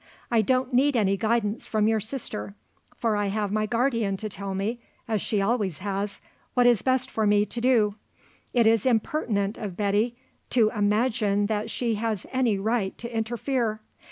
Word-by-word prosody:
I 230 -2 +4
don't 255 +3 +1
need 275 +3 +3
any 195 -3 +2
guidance 220 +1 0
from 215 -1 +1
your 220 0 +2
sister; 205 - -5 0.4
for 225 -2 +1
I 205 -1 0
have 205 0 -1
my 215 0 0
guardian 230 -4 +1
to 215 +2 -5
tell 195 0 -5
me, 215 +5 -2 0.3
as 220 -3 0
she 205 -3 0
always 205 -6 0
has, 200 +1 -3 0.3
what 245 -1 +4
is 240 -3 +5
best 260 0 +1
for 220 -1 +1
me 205 0 +4
to 235 +3 -5
do. 230 -5 +3 0.6
It 235 -2 +3
is 225 +1 +4
impertinent 220 -4 0
of 200 -5 -5
Betty 210 +3 +1 0.3
to 225 -4 +3
imagine 210 -1 +1
that 210 0 -1
she 235 -2 -1
has 220 -4 -2
any 250 -6 +2
right 210 -1 -1
to 235 0 -7
interfere. 225 0 -1
220 Hz, 175 wpm, -26 LUFS, 205-240 Hz, 0.6 s, is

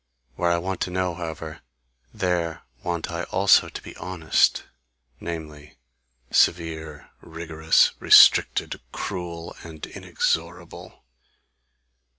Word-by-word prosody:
Where 85 - 0
I 85 - +2
want 95 +2 -4
to - - -1
know, 90 0 -1
however, 80 -2 -7 0.5
there 90 -5 -2 0.2
want 85 -1 -3
I 85 0 -3
also 100 0 +4
to - - -8
be - - -11
honest 90 -2 +1 0.6
namely, 75 -3 -8 0.6
severe, 80 -3 0
rigorous, 80 -1 +1
restricted, - - +5
cruel 85 -2 -6
and 80 -2 -8
inexorable. - - -4
85 Hz, 100 wpm, -24 LUFS, 80-90 Hz, 0.6 s, restricted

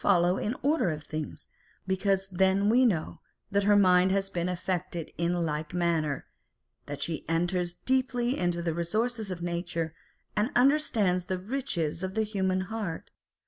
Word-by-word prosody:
471 - - 0 0.3
follow - - -2
in 210 - 0
the 265 - -4
order 305 - +3
of 155 -1 -4
things, 155 0 -6 0.4
because 195 0 0
we 180 - -9
then 190 +1 +4 0.2
know 170 -8 -1 0.3
that 200 0 +2
her 205 0 +5
mind 185 -2 +5
has 195 0 0
been 175 0 -1
affected 180 -2 -3
in 170 +1 0
like 150 +1 -3
manner, 165 -5 0 0.6
that 145 -1 -4
she 165 -3 -3
enters 175 +1 0
deeply 255 -1 +1
into 175 -1 -1
the 165 -2 0
resources 215 +6 -1
of 175 -2 -5
nature, 170 -2 -2 0.4
and 210 +3 +2
understands 235 - +3
the 185 0 -2
riches 180 - -2
of 190 0 -4
the 220 - +2
human 190 -3 0
heart. 200 -4 -5
185 Hz, 165 wpm, -29 LUFS, 170-205 Hz, 0.6 s, her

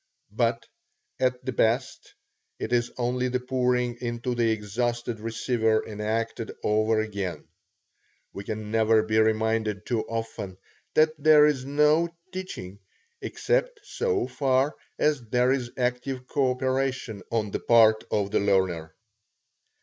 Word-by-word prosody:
But - - 0 0.5
at 125 -1 0
the 130 - -1
best, 120 +2 0 0.4
it 120 - -4
is 120 0 +1
only 125 +1 0
the 125 0 -1
pouring 125 -1 0
into 120 +1 -2
the 120 -1 +1
exhausted 115 +2 -2
receiver 110 0 0
enacted 110 +2 -3
over 110 +1 +2
again. 100 -4 -4 0.9
We 100 - -6
can 105 0 -5
never 110 -1 +4
be 110 0 +1
reminded 110 -1 +1
too 120 -3 0
often, 115 -5 -5 0.4
that 155 0 +5
there 150 0 +7
is 140 -4 +1
no 150 +4 +3 0.2
teaching 105 - -7 0.4
except - - -1
so 450 -5 -1
far 135 +1 +1 0.2
as 150 -3 +2
there 125 +3 +2
is 130 -3 -1
active 125 +1 -2
coöperation 130 -4 -1
on 110 -3 -1
the - - -2
part 110 -2 +5
of 100 -1 0
the - - +2
learner. 95 -5 0
120 Hz, 125 wpm, -26 LUFS, 110-130 Hz, 0.9 s, there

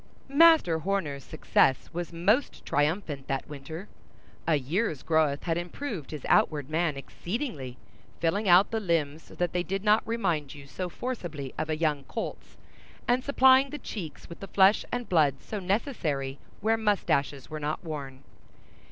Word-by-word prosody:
Master 290 - +6
Horner's 160 -6 -2
success 135 - +1
was 175 0 -4
most 200 +11 +1
triumphant 145 -1 -1
that 135 -1 -2
winter. 150 +6 -8 0.6
A 160 - +4
year's 155 - -1
growth 155 -3 +2
had 170 -1 0
improved 175 - -5
his 150 -4 -7
outward 150 -2 +2
man 160 -3 0
exceedingly, 150 - -5 0.4
filling 195 +5 +1
out 180 +3 +6
the 225 - 0
limbs 165 -6 0
so - - -15
that 175 0 -1
they 180 - +1
did 195 +2 -3
not 215 +1 +5
remind 175 -12 -1
you 140 -1 -11
so 180 +6 -5
forcibly 170 - -5
of 155 - -3
a 155 - 0
young 150 -3 0
colt's, 225 - -6 0.5
and 245 +1 +2
supplying 265 0 +5
the 295 - -5
cheeks 185 - -7
with 170 - -10
the 195 - -7
flesh 195 +2 +5
and 245 -1 -3
blood 150 -6 +3
so 210 - -5
necessary 170 - -2 0.2
where 225 +2 +2
mustaches 155 - 0
were 155 - -4
not 150 +3 -3
worn. 140 -5 -6
170 Hz, 160 wpm, -28 LUFS, 145-210 Hz, 0.6 s, Master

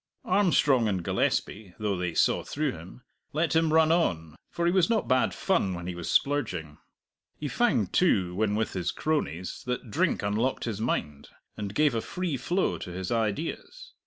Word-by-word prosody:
Armstrong 145 - +3
and 95 -4 -1
Gillespie 95 +2 -1
though 105 -2 -1
they 90 -2 -3
saw - - +3
through 150 -1 -1
him 90 +9 -11 0.3
let 160 +2 0
him 160 -1 +3
run 160 0 +5
on, 80 - 0
for 170 0 -2
he 170 - +4
was 180 -2 +3
not 230 -2 +1
bad 130 0 +3
fun 135 - 0
when 85 0 -7
he 90 - -3
was 85 -1 -6
splurging. 95 - 0 0.6
He 150 - -4
found, 135 - +1
too, 95 - +3
when 105 +2 0
with 110 0 -1
his 90 -2 -2
cronies 95 - -2
that 125 -2 -3
drink - - +1
unlocked 110 +6 0
his 110 -3 -3
mind, 75 - -2 0.3
and 105 -1 -5
gave 150 -3 +3
a 115 - 0
free 180 +1 -3
flow 175 +9 0
to - - -7
his 90 +1 -5
ideas. 155 - -3
115 Hz, 180 wpm, -28 LUFS, -, 0.6 s, run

